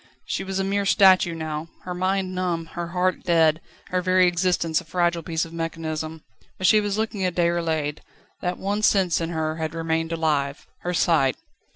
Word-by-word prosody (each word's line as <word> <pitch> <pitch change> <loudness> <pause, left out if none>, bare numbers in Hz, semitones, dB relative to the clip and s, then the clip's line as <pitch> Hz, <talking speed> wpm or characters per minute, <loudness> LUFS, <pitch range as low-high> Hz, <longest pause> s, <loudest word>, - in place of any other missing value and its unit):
She - - -2
was 190 0 -4
a 195 - +1
mere 200 +1 0
statue 185 -4 +5
now, 155 0 -4 0.2
her 180 - -5
mind 185 +1 -1
numb, 175 -3 -1
her 175 0 -4
heart 180 +1 0
dead, 165 -2 +3 0.3
her 180 0 0
very 185 0 +4
existence 175 -2 +1
a - - -16
fragile 175 0 0
piece 160 +1 -2
of 165 - -12
mechanism. 160 -1 -4 0.3
But 185 - -2
she 215 +3 +6
was 205 0 -2
looking 215 -3 -2
at 180 -2 0
Déroulède. 165 -4 0 0.4
That 180 0 -2
one 205 +2 -2
sense 190 -5 +3
in 165 - -2
her 160 -1 -2
had 160 0 -3
remained 165 0 -1
alive: 150 -4 -1
her 180 0 -3
sight. 155 -7 +3
170 Hz, 185 wpm, -24 LUFS, 160-185 Hz, 0.4 s, she